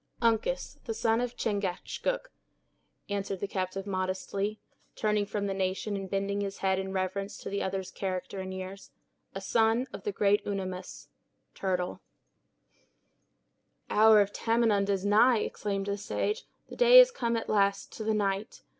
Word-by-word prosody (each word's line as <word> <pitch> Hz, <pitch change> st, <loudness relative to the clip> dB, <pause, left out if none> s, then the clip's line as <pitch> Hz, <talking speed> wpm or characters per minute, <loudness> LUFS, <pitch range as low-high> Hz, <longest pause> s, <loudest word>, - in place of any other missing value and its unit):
"Uncas, 230 Hz, -, 0 dB
the 225 Hz, -, -3 dB
son 225 Hz, +1 st, +2 dB
of 245 Hz, -1 st, -3 dB
Chingachgook," 215 Hz, -, -2 dB, 0.8 s
answered 200 Hz, -1 st, -3 dB
the 200 Hz, -, -2 dB
captive 190 Hz, 0 st, -3 dB
modestly, 195 Hz, +2 st, -2 dB, 0.4 s
turning 210 Hz, -1 st, +1 dB
from 205 Hz, 0 st, -2 dB
the 195 Hz, -, -1 dB
nation, 190 Hz, +2 st, -1 dB
and 195 Hz, -1 st, -5 dB
bending 200 Hz, +1 st, -1 dB
his 195 Hz, -1 st, -4 dB
head 190 Hz, -1 st, +1 dB
in 190 Hz, 0 st, -4 dB
reverence 190 Hz, +1 st, -2 dB
to -, -, -7 dB
the 200 Hz, -, -1 dB
other's 190 Hz, 0 st, -3 dB
character 185 Hz, 0 st, -4 dB
and 190 Hz, 0 st, -5 dB
years; 190 Hz, +1 st, -7 dB, 0.5 s
"a -, -, -2 dB
son 225 Hz, +4 st, +2 dB
of -, -, -6 dB
the 420 Hz, -, -2 dB
great 205 Hz, -, +2 dB
Unamis." 185 Hz, -2 st, -5 dB, 0.4 s
Turtle. 180 Hz, -2 st, -2 dB, 1.9 s
"The -, -, -3 dB
hour 215 Hz, 0 st, +7 dB
of 200 Hz, 0 st, -1 dB
Tamenund 225 Hz, -3 st, +2 dB
is 195 Hz, -1 st, 0 dB
nigh!" 220 Hz, +3 st, +5 dB
exclaimed 200 Hz, -2 st, -2 dB
the 200 Hz, 0 st, -2 dB
sage; 425 Hz, -, -2 dB, 0.2 s
"the -, -, -10 dB
day -, -, +8 dB
is -, -, +8 dB
come, 235 Hz, -, -1 dB
at 225 Hz, -, -4 dB
last, 200 Hz, -1 st, +1 dB
to 220 Hz, -, -6 dB
the 220 Hz, 0 st, +1 dB
night! 200 Hz, +1 st, -2 dB
200 Hz, 160 wpm, -29 LUFS, 190-220 Hz, 1.9 s, day